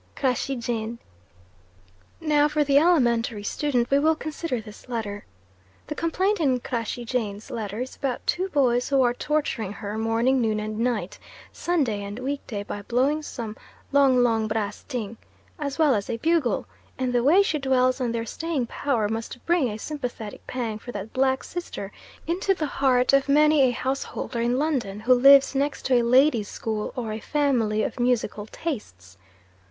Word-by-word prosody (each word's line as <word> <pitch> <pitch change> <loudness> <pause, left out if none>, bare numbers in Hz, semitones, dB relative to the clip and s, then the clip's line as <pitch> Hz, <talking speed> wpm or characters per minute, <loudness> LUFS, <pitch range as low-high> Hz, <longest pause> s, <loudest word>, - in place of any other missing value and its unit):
Crashey 270 0 0
Jane." 235 -1 -3 1.2
Now 295 -2 +3
for 300 0 +1
the 280 0 +4
elementary 240 -10 +2
student 245 0 0
we 280 - +5
will 315 +2 +3
consider 310 -4 -4
this 215 +3 -12
letter. 205 -4 -4 0.6
The - - -4
complaint 370 +6 0
in 265 -6 +2
Crashey 240 -1 -4
Jane's 220 -4 -3
letter 215 0 -4
is 255 - -6
about 265 -3 -3
two 375 +2 0
boys 250 -6 +2
who 275 -2 +4
are 240 -1 +3
torturing 245 -7 -2
her 210 +1 -5
morning, 230 +4 +2
noon, 215 -2 +1
and 215 0 -4
night, 235 -2 -1 0.3
Sunday 275 -12 0
and 200 +1 -6
weekday, 255 -5 -4
by 205 0 -6
blowing 260 +8 +1
some 230 -7 -6 0.4
"long 270 -3 +5
long 225 -2 +2
brass 215 -1 -2
ting" 225 -3 -4 0.4
as 280 -2 -3
well 310 -4 +4
as 205 -3 -2
a 230 - -1
bugle, 320 -1 +1 0.3
and 255 -1 -1
the 245 - +3
way 345 +9 +6
she 310 -6 -1
dwells 255 -1 +2
on 240 -2 0
their 230 0 -2
staying 315 +1 -2
power 235 -3 -1
must 225 +3 -5
bring 340 -7 +2
a 210 - -5
sympathetic 245 -5 -6
pang 230 -4 -3
for 245 - -8
that 205 -1 -7
black 265 0 +1
sister 345 - -6 0.3
into 370 +3 +1
the 315 - -2
heart 260 -2 +2
of 275 0 +3
many 300 +1 +5
a 260 - +5
householder 260 -1 -3
in 240 +2 +1
London 260 -9 -1
who 255 +3 +5
lives 275 +2 +7
next 280 +1 -1
to 265 - +2
a 245 - +5
ladies' 240 -2 +3
school, 215 -2 -3
or 230 -3 -3
a 215 - -4
family 235 -6 +1
of - - -4
musical 235 -4 0
tastes. 95 - -6
250 Hz, 170 wpm, -25 LUFS, 225-285 Hz, 1.2 s, lives